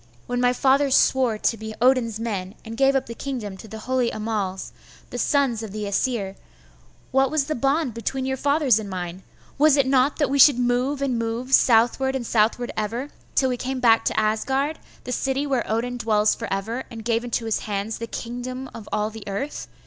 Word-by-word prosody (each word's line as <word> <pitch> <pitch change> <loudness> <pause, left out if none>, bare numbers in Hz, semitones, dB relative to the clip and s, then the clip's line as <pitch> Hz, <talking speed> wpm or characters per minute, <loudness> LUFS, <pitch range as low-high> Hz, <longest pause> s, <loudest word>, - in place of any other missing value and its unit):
When 245 0 -2
my 245 0 +4
fathers 270 +2 +3
swore 255 -5 +3
to 230 - 0
be 220 0 -7
Odin's 240 -3 +2
men, 200 -4 -4
and 225 0 -6
gave 270 +2 +3
up 265 -1 +1
the 230 - -7
kingdom 230 -6 -5
to 220 - -11
the 220 +1 -8
holy 255 0 0
Annals, 210 -3 -3 0.4
the - - -4
sons 275 -6 +1
of 220 -3 -6
the 210 +1 -4
Aesir, 200 -1 -1 0.8
what 270 0 +3
was 305 -1 +1
the 310 - -2
bond 275 0 0
between 260 +4 -3
your 265 0 -1
fathers 280 -4 +3
and 210 -2 -6
mine? 180 -1 -5 0.4
Was 300 -1 +5
it 275 - +4
not 265 +1 +2
that 290 -4 +1
we 280 - +1
should 275 -1 +8
move 250 +3 0
and 255 -4 0
move, 230 +3 -3
southward 245 +3 +4
and 255 -3 -3
southward 230 +2 +1
ever, 230 +7 -3 0.2
till 265 - +3
we 250 - -1
came 260 +1 -3
back 230 -2 +4
to - - +1
Asgard, 265 +8 0 0.2
the 250 - -6
city 270 +2 -1
where 265 -4 -1
Odin 240 +3 -1
dwells 215 -2 +3
for 230 - -6
ever, 220 +6 -2
and 225 -2 -9
gave 230 0 +1
into 235 -1 -2
his 225 - 0
hands 205 +1 -3
the 230 - -4
kingdom 250 +3 -6
of 220 -3 -10
all 215 +1 0
the 220 -1 -9
earth? 205 +9 -4
240 Hz, 205 wpm, -23 LUFS, 220-265 Hz, 0.8 s, should